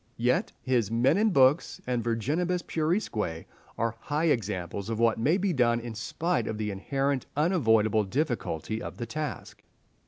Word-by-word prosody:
Yet 125 +2 +1
his 120 -6 +1
"Men 120 +6 +3
and 220 0 +3
Books" 135 0 +3
and 125 -2 -1
"Virginibus 155 +11 0
Puerisque" 155 - -1 0.3
are 115 0 -1
high 150 +5 -1
examples 100 - -2
of 115 - -2
what 115 -1 +2
may 150 +10 +3
be 195 -2 0
done 120 -4 +3
in 120 -1 -6
spite 165 +10 -1
of 110 - -3
the 105 -1 -2
inherent 135 +7 -1
unavoidable 110 - +3
difficulty 110 - -2
of - - -7
the 120 - -4
task. 150 +4 -5
120 Hz, 155 wpm, -28 LUFS, 110-150 Hz, 0.3 s, Men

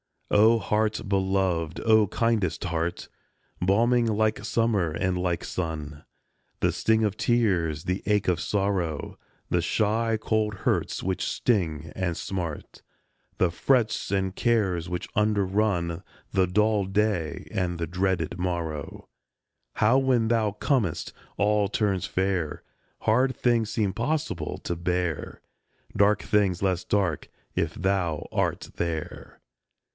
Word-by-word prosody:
O 110 +3 +6
HEART 110 -1 0
beloved, 95 -4 0
O 110 -2 +4
kindest 110 -6 0
heart! 85 -1 -2 0.5
Balming 115 +6 +3
like 110 -1 +1
summer 110 -6 +1
and 90 +3 -1
like 90 -1 -1
sun 75 -4 -5 0.6
The - - +3
sting 110 0 +2
of 105 -1 0
tears, 90 -11 +1
the 90 +2 -2
ache 105 -2 +2
of 90 -2 +1
sorrow, 95 -6 -1 0.3
The - - +2
shy, 110 +1 +1
cold 110 -1 0
hurts - - -1
which 95 0 -1
sting 80 -9 0
and 90 -3 -1
smart, 85 -5 -5 0.6
The 90 -2 +2
frets 120 +4 +1
and 95 -1 0
cares 95 -8 +1
which 90 0 -3
underrun 100 -4 +1 0.3
The 95 -1 +2
dull 105 +2 +2
day 95 -6 -1
and 90 -2 -1
the 85 - -2
dreaded 90 0 -1
morrow 85 -5 -4 0.7
How 115 +5 +4
when 125 -4 +2
thou 110 -3 +2
comest 105 - 0 0.3
all 105 0 +2
turns 100 -3 0
fair, 95 -5 -1 0.4
Hard 130 +4 +2
things 115 -3 +1
seem 105 -5 0
possible 140 - -2
to 85 - -3
bear; 90 -2 -2 0.5
Dark 105 +1 +3
things 100 -3 +1
less 95 -2 0
dark, 95 -6 0 0.2
if 80 0 -1
thou 90 -4 -1
art - - -1
there. 80 -2 -4
95 Hz, 125 wpm, -26 LUFS, 85-110 Hz, 0.7 s, O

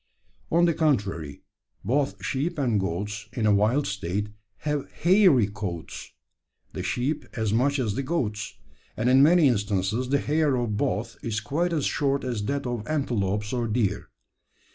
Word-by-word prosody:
On 170 +1 +4
the 170 - +3
contrary, 100 - -1 0.4
both 115 -5 0
sheep 155 +8 -1
and 120 -7 +1
goats 100 +3 -3
in 120 -4 -1
a 105 - +5
wild 110 +8 +2
state 100 +1 -3 0.4
have 150 -2 -2
hairy 180 - +4
coats 85 - -6 0.6
the - - -4
sheep 145 +5 -1
as 110 -3 0
much 140 +5 +2
as 115 -6 0
the 135 - -2
goats; 125 -9 -2 0.4
and 110 - 0
in 130 +1 +6
many 160 +1 +6
instances 105 +1 0
the 140 - +3
hair 150 -1 +1
of 120 -4 -1
both 105 +3 -2
is 110 -2 -2
quite 155 +12 -1
as 155 -4 0
short 140 -1 0
as 120 -5 -2
that 140 +4 -2
of 120 -3 -3
antelopes 105 -8 -1
or 120 -2 0
deer. 105 -3 -1
120 Hz, 160 wpm, -26 LUFS, 105-140 Hz, 0.6 s, in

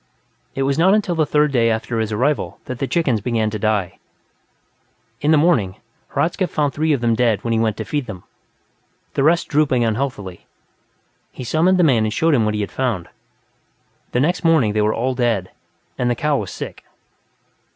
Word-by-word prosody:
It 135 - 0
was 140 +2 0
not 190 +4 +5
until 205 -4 0
the 160 -3 +1
third 150 0 +2
day 115 -3 +3
after 115 +1 -2
his 110 -1 -2
arrival 130 +8 -1
that 130 -1 -6
the 135 - -1
chickens 135 - 0
began 110 -1 0
to 110 - -4
die. 105 -4 -1 1.2
In 145 - +1
the 155 - +5
morning, 135 - +2 0.4
Hradzka 180 +2 0
found 145 -4 -1
three 155 +1 0
of 140 -5 +1
them 120 -1 +2
dead 115 -3 +1
when 115 - -1
he 110 - +1
went 110 -1 0
to 110 - -4
feed 145 +2 -3
them, 95 -6 -8 0.9
the - - 0
rest 165 +4 +3
drooping 140 -5 +2
unhealthily; 110 -5 -3 0.8
he - - -8
summoned 165 +9 +2
the 180 - +4
man 125 -8 +4
and 110 - -1
showed 160 +8 +2
him 115 -6 +3
what 105 0 0
he 105 - -1
had 100 - -4
found. 120 -10 -2 1.0
The 125 - 0
next 170 +8 0
morning, 155 -11 +3
they 105 - +1
were 105 +1 +2
all 130 +3 -1
dead, 115 -7 -1 0.5
and 125 - +1
the 120 - +1
cow 150 +4 0
was 105 -8 -3
sick. - - -8
125 Hz, 195 wpm, -20 LUFS, 110-150 Hz, 1.2 s, not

